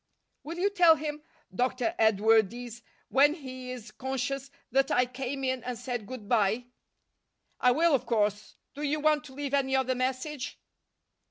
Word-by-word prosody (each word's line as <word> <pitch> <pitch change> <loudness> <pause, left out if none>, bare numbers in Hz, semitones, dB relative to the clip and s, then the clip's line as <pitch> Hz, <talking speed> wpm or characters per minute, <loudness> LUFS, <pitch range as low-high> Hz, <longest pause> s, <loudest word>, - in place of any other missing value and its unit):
"Will 330 +3 -7
you 395 +3 +1
tell 350 -5 +6
him, 300 -1 -5 0.3
Dr. 250 +2 0
Edwardes, 225 +2 +2 0.3
when 290 +3 +5
he 255 -5 -8
is 240 -4 -7
conscious, 265 +2 -3 0.2
that 270 +2 +3
I 250 - +3
came 265 +2 -5
in 260 -2 -1
and 250 -1 -4
said 245 -3 -4
good 250 -4 -8
bye?" 220 +1 +2 0.9
"I 250 - +5
will, 325 +5 +3
of 270 - +1
course. 210 -2 0 0.2
Do 290 - -8
you 300 +1 0
want 305 0 +2
to 265 - -12
leave 280 0 -4
any 265 -1 +2
other 260 -1 +2
message?" 255 +2 -3
255 Hz, 160 wpm, -29 LUFS, 240-280 Hz, 0.9 s, tell